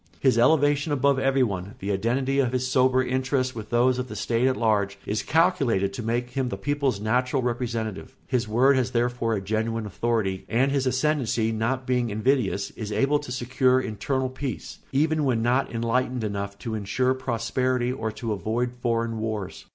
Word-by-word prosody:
His 130 Hz, -4 st, +3 dB
elevation 145 Hz, +2 st, +3 dB
above 140 Hz, -1 st, +2 dB
everyone, 120 Hz, -9 st, 0 dB
the 100 Hz, +2 st, -3 dB
identity 130 Hz, +7 st, 0 dB
of 130 Hz, -2 st, +1 dB
his 130 Hz, 0 st, 0 dB
sober 130 Hz, 0 st, +3 dB
interests 130 Hz, 0 st, 0 dB
with 110 Hz, -2 st, -7 dB
those 125 Hz, +2 st, +3 dB
of 125 Hz, -, -3 dB
the 110 Hz, -, -8 dB
state 115 Hz, +4 st, +1 dB
at 130 Hz, -, +1 dB
large, 100 Hz, -3 st, +1 dB
is 105 Hz, +1 st, -1 dB
calculated 135 Hz, -, +2 dB
to 110 Hz, -, -5 dB
make 120 Hz, +2 st, -2 dB
him 130 Hz, -1 st, -1 dB
the 95 Hz, -, -4 dB
people's 140 Hz, -1 st, -1 dB
natural 125 Hz, +5 st, 0 dB
representative; 115 Hz, -2 st, -3 dB
his 125 Hz, -4 st, -1 dB
word 130 Hz, +5 st, +4 dB
has 130 Hz, -1 st, +1 dB
therefore 120 Hz, -2 st, 0 dB
a 100 Hz, -, -2 dB
genuine 110 Hz, +2 st, -2 dB
authority, 105 Hz, -2 st, -1 dB
and 130 Hz, +4 st, +2 dB
his 135 Hz, -2 st, +1 dB
ascendency, 130 Hz, -4 st, +1 dB
not 115 Hz, +4 st, -1 dB
being 125 Hz, -2 st, +1 dB
invidious, 110 Hz, -2 st, 0 dB
is 110 Hz, -2 st, -6 dB
able 140 Hz, +6 st, +2 dB
to 145 Hz, -4 st, -8 dB
secure 130 Hz, +1 st, +2 dB
internal 130 Hz, +3 st, -2 dB
peace, 130 Hz, 0 st, -6 dB
even 155 Hz, +3 st, +2 dB
when 120 Hz, -5 st, +1 dB
not 125 Hz, +3 st, +1 dB
enlightened 120 Hz, +1 st, 0 dB
enough 100 Hz, -1 st, -3 dB
to 115 Hz, +2 st, -5 dB
insure 120 Hz, +5 st, 0 dB
prosperity 125 Hz, 0 st, -1 dB
or 110 Hz, -4 st, -3 dB
to 110 Hz, 0 st, -3 dB
avoid 115 Hz, +4 st, -2 dB
foreign 115 Hz, -2 st, -1 dB
wars. 110 Hz, -3 st, -4 dB
125 Hz, 175 wpm, -25 LUFS, 110-130 Hz, -, word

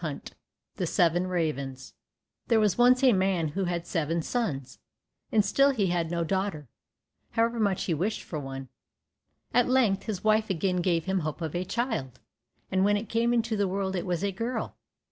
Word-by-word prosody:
25 155 Hz, -5 st, -6 dB, 0.4 s
The -, -, -1 dB
Seven 175 Hz, +1 st, +2 dB
Ravens 140 Hz, -7 st, -3 dB, 0.5 s
There 230 Hz, -2 st, +4 dB
was 210 Hz, -4 st, +3 dB
once 250 Hz, +2 st, +5 dB
a 255 Hz, -3 st, +6 dB
man 185 Hz, -4 st, +1 dB
who 190 Hz, +6 st, -2 dB
had 175 Hz, -1 st, -2 dB
seven 165 Hz, -1 st, -1 dB
sons, 140 Hz, -, -3 dB, 0.5 s
and 210 Hz, -2 st, +3 dB
still 275 Hz, +8 st, +4 dB
he 205 Hz, -10 st, +1 dB
had 170 Hz, -2 st, 0 dB
no 170 Hz, 0 st, -1 dB
daughter, 190 Hz, -4 st, -2 dB, 0.7 s
however 230 Hz, +1 st, +1 dB
much 200 Hz, -4 st, +1 dB
he 175 Hz, -, 0 dB
wished 190 Hz, +8 st, -1 dB
for 155 Hz, -, -5 dB
one. 135 Hz, -1 st, -7 dB, 0.8 s
At 245 Hz, +1 st, +3 dB
length 235 Hz, -7 st, +2 dB
his 205 Hz, -5 st, -3 dB
wife 215 Hz, 0 st, +3 dB
again 185 Hz, 0 st, 0 dB
gave 170 Hz, -2 st, +1 dB
him 190 Hz, 0 st, 0 dB
hope 155 Hz, -1 st, -4 dB
of 160 Hz, -3 st, -4 dB
a 175 Hz, -, -1 dB
child, 225 Hz, -, -3 dB, 0.5 s
and 190 Hz, 0 st, +2 dB
when 205 Hz, +1 st, +3 dB
it 210 Hz, +2 st, -6 dB
came 230 Hz, +1 st, +1 dB
into 230 Hz, -2 st, +1 dB
the 200 Hz, -1 st, +1 dB
world 190 Hz, 0 st, -2 dB
it 175 Hz, -, -3 dB
was 175 Hz, 0 st, -1 dB
a 200 Hz, -, +1 dB
girl. 230 Hz, +4 st, -3 dB
190 Hz, 185 wpm, -28 LUFS, 165-220 Hz, 0.8 s, a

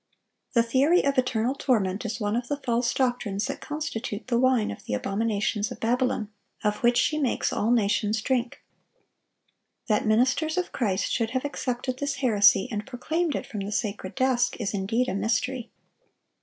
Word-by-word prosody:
The 235 Hz, -2 st, +4 dB
theory 270 Hz, +9 st, +3 dB
of 280 Hz, -1 st, +2 dB
eternal 250 Hz, -1 st, 0 dB
torment 215 Hz, -7 st, 0 dB
is 225 Hz, +1 st, -3 dB
one 210 Hz, 0 st, -1 dB
of 240 Hz, 0 st, -2 dB
the 290 Hz, -, -1 dB
false 240 Hz, -3 st, 0 dB
doctrines 245 Hz, -6 st, 0 dB
that -, -, -5 dB
constitute 260 Hz, -8 st, -4 dB
the 235 Hz, -1 st, +2 dB
wine 255 Hz, -3 st, +3 dB
of 100 Hz, -, -9 dB
the 105 Hz, -, -1 dB
abominations 210 Hz, -, -1 dB
of -, -, -7 dB
Babylon, 240 Hz, -2 st, 0 dB, 0.3 s
of 210 Hz, -1 st, +1 dB
which 240 Hz, 0 st, +3 dB
she 305 Hz, +4 st, +2 dB
makes 270 Hz, -5 st, 0 dB
all 215 Hz, -, 0 dB
nations 210 Hz, -1 st, +2 dB
drink.(939) 245 Hz, +1 st, -7 dB
That 215 Hz, 0 st, +2 dB
ministers 255 Hz, +9 st, +2 dB
of 365 Hz, -, -1 dB
Christ 205 Hz, -6 st, -1 dB
should 230 Hz, -2 st, 0 dB
have 260 Hz, +3 st, -2 dB
accepted 255 Hz, -2 st, -3 dB
this 285 Hz, 0 st, -1 dB
heresy 205 Hz, -7 st, +4 dB
and 210 Hz, -1 st, -4 dB
proclaimed 315 Hz, +5 st, -1 dB
it -, -, -3 dB
from 210 Hz, -, -6 dB
the 200 Hz, +1 st, -4 dB
sacred 205 Hz, -3 st, -3 dB
desk, 255 Hz, -2 st, +1 dB
is 210 Hz, -3 st, -2 dB
indeed 220 Hz, +6 st, 0 dB
a -, -, -1 dB
mystery. 225 Hz, +5 st, -1 dB
235 Hz, 170 wpm, -26 LUFS, 210-260 Hz, 0.3 s, The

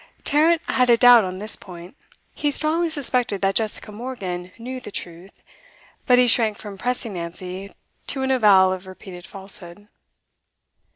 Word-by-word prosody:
Tarrant 320 Hz, +3 st, +2 dB
had 250 Hz, -1 st, +1 dB
a 235 Hz, -, +6 dB
doubt 245 Hz, -2 st, +7 dB
on 185 Hz, 0 st, -5 dB
this 210 Hz, +3 st, -3 dB
point. 175 Hz, +2 st, -12 dB, 0.4 s
He 295 Hz, -, -1 dB
strongly 315 Hz, +4 st, +1 dB
suspected 250 Hz, -9 st, 0 dB
that 195 Hz, 0 st, +2 dB
Jessica 215 Hz, 0 st, -2 dB
Morgan 195 Hz, -6 st, -6 dB
knew 255 Hz, +3 st, -7 dB
the -, -, -9 dB
truth, 175 Hz, -1 st, -9 dB, 0.6 s
but 250 Hz, -, +5 dB
he 250 Hz, -, +5 dB
shrank 225 Hz, -3 st, +2 dB
from 205 Hz, -2 st, -9 dB
pressing 240 Hz, +1 st, 0 dB
Nancy 180 Hz, +3 st, -7 dB, 0.4 s
to 265 Hz, -1 st, -2 dB
an 265 Hz, -, 0 dB
avowal 200 Hz, -7 st, +5 dB
of 185 Hz, 0 st, -8 dB
repeated 185 Hz, -1 st, -11 dB
falsehood. 195 Hz, 0 st, -6 dB
210 Hz, 155 wpm, -22 LUFS, 185-250 Hz, 0.6 s, doubt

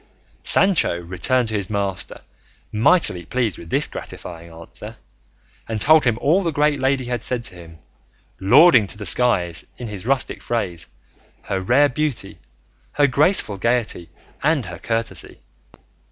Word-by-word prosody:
Sancho 190 Hz, -, +3 dB
returned 110 Hz, +8 st, 0 dB
to -, -, -5 dB
his 100 Hz, -3 st, -2 dB
master 100 Hz, -3 st, -4 dB, 0.5 s
mightily 110 Hz, -, +3 dB
pleased 115 Hz, -1 st, -2 dB
with 85 Hz, -, -12 dB
this -, -, +2 dB
gratifying 85 Hz, -1 st, -8 dB
answer, 80 Hz, 0 st, -6 dB, 0.7 s
and 110 Hz, -1 st, -3 dB
told 155 Hz, +6 st, +5 dB
him 115 Hz, -3 st, +1 dB
all 165 Hz, +10 st, +2 dB
the 170 Hz, -3 st, -1 dB
great 150 Hz, -1 st, +1 dB
lady 135 Hz, 0 st, 0 dB
had 120 Hz, -2 st, -3 dB
said 125 Hz, -1 st, -1 dB
to 115 Hz, -, -4 dB
him, 85 Hz, -2 st, -13 dB, 0.6 s
lauding 125 Hz, -, +5 dB
to 105 Hz, -, -6 dB
the 105 Hz, -, -7 dB
skies, 90 Hz, -5 st, +2 dB
in 125 Hz, -, -7 dB
his 105 Hz, 0 st, -8 dB
rustic 135 Hz, -1 st, 0 dB
phrase, 95 Hz, -8 st, -3 dB, 0.6 s
her 95 Hz, -1 st, -3 dB
rare 130 Hz, +9 st, +3 dB
beauty, 125 Hz, -, -3 dB, 0.5 s
her 145 Hz, -, +3 dB
graceful 140 Hz, -, +3 dB
gaiety, 115 Hz, -7 st, -1 dB, 0.3 s
and 150 Hz, -4 st, +1 dB
her 90 Hz, -2 st, -9 dB
courtesy. 115 Hz, -6 st, -3 dB
115 Hz, 145 wpm, -20 LUFS, 95-135 Hz, 0.7 s, told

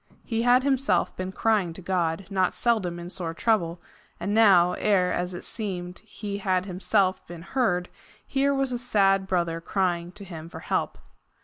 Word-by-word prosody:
He 225 Hz, -1 st, -1 dB
had 245 Hz, +2 st, +4 dB
himself 265 Hz, -9 st, +1 dB
been 185 Hz, 0 st, -4 dB
crying 200 Hz, -5 st, +1 dB
to 190 Hz, -, -9 dB
God, 180 Hz, 0 st, -1 dB
not 185 Hz, -2 st, +1 dB
seldom 210 Hz, -8 st, +1 dB
in 175 Hz, 0 st, -7 dB
sore 170 Hz, -2 st, -3 dB
trouble, 175 Hz, -6 st, +1 dB, 0.4 s
and 205 Hz, -, -2 dB
now, 195 Hz, -6 st, +6 dB
ere, 185 Hz, -4 st, +2 dB
as 180 Hz, 0 st, -2 dB
it -, -, -7 dB
seemed, 180 Hz, -5 st, -5 dB
he 205 Hz, -2 st, -6 dB
had 185 Hz, -2 st, 0 dB
himself 190 Hz, 0 st, +1 dB
been 170 Hz, -1 st, -9 dB
heard, 180 Hz, -6 st, 0 dB, 0.4 s
here 275 Hz, +1 st, +1 dB
was 270 Hz, -1 st, 0 dB
a 245 Hz, -, -2 dB
sad 195 Hz, -5 st, +2 dB
brother 170 Hz, -3 st, 0 dB
crying 175 Hz, -1 st, -1 dB
to 200 Hz, -, -10 dB
him 165 Hz, -3 st, -9 dB
for -, -, -9 dB
help. -, -, -1 dB
190 Hz, 175 wpm, -26 LUFS, 175-220 Hz, 0.4 s, now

